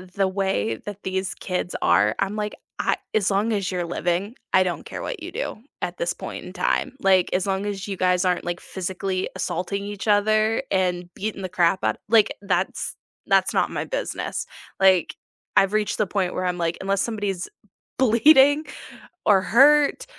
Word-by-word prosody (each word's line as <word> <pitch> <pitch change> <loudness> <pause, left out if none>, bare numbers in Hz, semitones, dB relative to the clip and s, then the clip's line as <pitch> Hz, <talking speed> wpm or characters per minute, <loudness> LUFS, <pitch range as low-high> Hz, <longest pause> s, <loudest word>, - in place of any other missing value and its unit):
the 195 -1 +2
way 190 - -1
that 205 -1 -7
these 190 0 -2
kids 180 -1 -3
are, 100 +5 +3
I'm 200 +2 -1
like, 210 0 -3 0.2
I - - +2 0.2
as 200 -2 +2
long 205 +4 +1
as 195 -2 -1
you're 175 -1 -2
living, 175 +6 -2 0.2
I 185 - +6
don't 180 -1 -3
care - - -6
what 450 -9 -5
you 350 - -6
do - - -4 0.2
at - - -3
this - - -1
point - - -7
in - - -9
time. 270 -1 -1
Like, 190 -2 +4
as 185 +1 0
long 195 +1 -1
as 200 -1 -4
you 195 -2 -4
guys 180 0 +2
aren't 180 -1 0
like 175 +1 -3
physically 190 0 -3
assaulting 190 +3 -3
each 205 +1 -6
other 215 +1 +3
and 180 -2 0
beating 210 -1 -4
the 185 - -4
crap 175 +1 +2
out - - +1
like, 220 -1 +4
that's 190 -2 -1 0.3
that's - - +3
not - - +1
my - - -2
business, - - -3 0.3
like, 190 -3 +4 0.4
I've 195 +1 +4
reached 215 -1 0
the 215 - +1
point 185 -2 -1
where 185 - -2
I'm 180 0 -1
like, 170 -1 -1
unless 195 0 0
somebody's 205 -5 -3 0.5
bleeding, 270 +4 +6 0.6
or 195 -3 +5
hurt, 290 - +5
195 Hz, 180 wpm, -23 LUFS, 185-215 Hz, 0.6 s, I